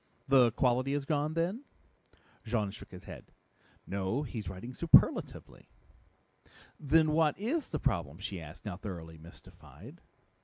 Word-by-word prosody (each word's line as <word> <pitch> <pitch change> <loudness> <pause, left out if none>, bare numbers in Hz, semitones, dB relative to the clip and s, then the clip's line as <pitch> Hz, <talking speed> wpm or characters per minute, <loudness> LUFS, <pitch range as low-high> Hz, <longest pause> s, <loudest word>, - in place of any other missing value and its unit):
"The 130 -4 +5
quality 130 +3 +1
is 145 -1 -2
gone, 150 +1 -1
then?" 180 +10 -1 0.8
Jean 110 -3 -1
shook 105 - -11
his 90 -1 -11
head. - - -11 0.5
"No, 100 +8 -2
he's 110 -8 -5
writing 95 +7 -8
superlatively." 170 +5 +3 1.1
"Then 155 +2 +3
what 155 -1 +2
is 265 +9 -2
the 155 - -2
problem?" 80 - -1
she 95 -1 -6
asked, 80 +5 -12
now 100 -4 -4
thoroughly 85 -5 -8
mystified. 80 +2 -14
125 Hz, 130 wpm, -31 LUFS, 95-150 Hz, 1.1 s, The